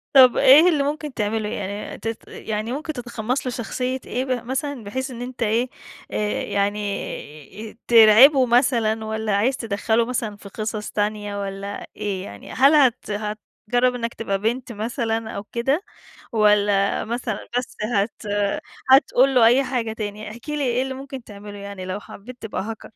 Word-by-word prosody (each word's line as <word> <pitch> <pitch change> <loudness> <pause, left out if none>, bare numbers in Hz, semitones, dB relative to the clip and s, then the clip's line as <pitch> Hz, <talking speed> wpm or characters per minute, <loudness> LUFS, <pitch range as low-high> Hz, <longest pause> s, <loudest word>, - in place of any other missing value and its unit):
طب 255 -2 +8
إيه 305 +7 +8
اللي 295 -4 +2
ممكن 295 0 -3
تعمله؟ 210 -1 -1
ي - - -6
ي - - -3
يعني 200 +1 -5
تت 225 0 -5
يعني 215 +2 -4
ممكن 310 +2 -4
تتقمص 245 0 -3
له 255 - -1
شخصية 250 +2 -3
إيه 255 +2 -2
ب 250 -3 -2
مثلًا، 265 -1 -3
بحيث 260 +6 -4
إن 240 0 -7
أنت 245 -1 -4
إيه، 230 +4 +1 0.4
آآ، - - -2 0.3
يعني، 200 -2 -4
آآ، - - -21
ترعبه 240 +4 +8
مثلًا 230 -3 +2
والّا 220 -1 -1
عايز 250 +6 +1
تدخلُّه 225 +1 0
مثلًا 230 -4 -3
في 200 -1 -12
قصص 215 0 -4
تانية 205 -1 -2
والّا 200 +1 -5
إيه 200 -3 -3
يعني؟ - - -10
هل 275 +4 +5
هت 255 -6 +3
هتجرب 215 +4 -1
إنك 235 -1 -3
تبقى 200 -3 -2
بنت 240 +4 -1
مثلًا 225 0 -2
أو 200 - -5
كده 270 - -1 0.5
والّا 205 -2 +3
مثلًا 235 -2 -4
بس 250 - -4 0.2
هت 205 +2 0 0.7
هتقول 265 -1 +5
له 235 -2 +7
أي 250 +4 +5
حاجة 240 -4 -2
تاني، 210 -1 -5
احكِ 235 +6 -11
لي 300 -1 -1
إيه 250 -1 +1
اللي 265 0 -4
ممكن 270 -1 -8
تعمله 205 -1 -10
يعني 200 -2 -7
لو 185 +2 -4
حبيت 240 +5 -11
تبقى 220 - -4
Hacker؟ 220 +1 -7
225 Hz, 170 wpm, -22 LUFS, 210-255 Hz, 0.7 s, طب